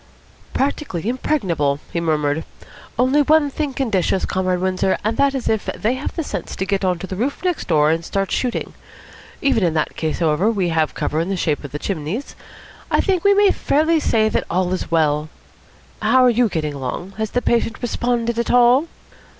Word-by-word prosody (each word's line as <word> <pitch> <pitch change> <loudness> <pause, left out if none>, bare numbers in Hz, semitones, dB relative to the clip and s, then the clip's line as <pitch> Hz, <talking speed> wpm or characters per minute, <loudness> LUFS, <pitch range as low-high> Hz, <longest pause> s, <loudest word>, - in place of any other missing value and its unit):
"Practically 270 - -1
impregnable," 175 - 0
he 170 - 0
murmured. 155 -1 0 0.5
"Only 260 +5 +3
one 295 0 +3
thing 295 0 -2
can 265 -5 -1
dish 190 -4 +1
us, 190 - 0
Comrade 185 -1 0
Windsor; 185 +1 0
and 215 +2 0
that 280 -1 +3
is 260 - -3
if 220 -2 0
they 225 +3 +1
have 260 +2 -5
the 330 - -2
sense - - -5
to 190 - -2
get 195 0 -1
on 180 -2 +1
to 175 - -6
the 190 - -6
roof 255 - -2
next 360 -3 -1
door 150 -2 +3
and 165 +1 -1
start 195 +3 -2
shooting. 250 -2 -2 0.7
Even 270 -7 +2
in 165 -2 +1
that 155 - -1
case, 160 -1 -2
however, 165 +5 +2
we 195 -6 0
have 160 -2 0
cover 155 - -1
in 170 +3 -1
the 195 - -1
shape 155 -4 -1
of 145 - -7
the 150 - -3
chimneys. 180 - -4 0.5
I - - +2
think 375 -4 +1
we 400 0 +5
may 405 -1 +5
fairly 315 +3 +2
say 220 -7 +2
that - - -1
all 180 +1 0
is 185 - -3
well. 155 -2 +1 0.7
How 260 0 +4
are 250 - +5
you 235 0 +2
getting 155 -4 -2
along? 140 +7 -5
Has 220 -1 -1
the 245 - -1
patient 230 -1 +1
responded 235 -1 -1
at 235 - -1
all?" 245 +5 +5
200 Hz, 205 wpm, -20 LUFS, 165-255 Hz, 0.7 s, we